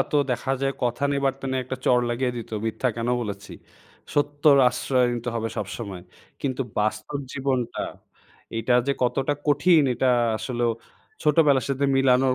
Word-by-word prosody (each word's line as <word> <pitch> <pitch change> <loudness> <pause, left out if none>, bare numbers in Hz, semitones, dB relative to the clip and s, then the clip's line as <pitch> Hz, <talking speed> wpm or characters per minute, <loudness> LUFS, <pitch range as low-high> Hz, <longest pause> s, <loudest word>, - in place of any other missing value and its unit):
তো - - +3
দেখা 130 +2 -1
যায় 135 0 +1
কথা 120 +2 -1
নেই, 140 - +1
বার্তা 135 0 -2
নাই 130 - 0
একটা 130 +1 -4
চড় 125 -1 +4
লাগিয়ে 125 +1 -1
দিত 115 - -7 0.2
মিথ্যা 125 +3 0
কেন 115 +1 -2
বলেছি। 100 -3 -6 0.6
সত্যর 145 0 +4
আশ্রয় 125 0 +1
নিতে 120 +1 -4
হবে 115 0 -1
সবসময়। 100 -2 -5 0.4
কিন্তু 135 -1 -1 0.2
বাস্তব 110 +7 -1
জীবনটা; 130 -3 -1 0.7
এটা 115 +2 +1
যে 140 - +2
কতটা 135 +3 +1
কঠিন 150 +2 +5
এটা 130 +2 +1 0.3
আসলেও 120 +1 -1 0.5
ছোটোবেলার 150 -3 +4
সাথে 140 +1 0
মিলানোর 130 -1 +4
130 Hz, 150 wpm, -24 LUFS, 120-140 Hz, 0.7 s, কঠিন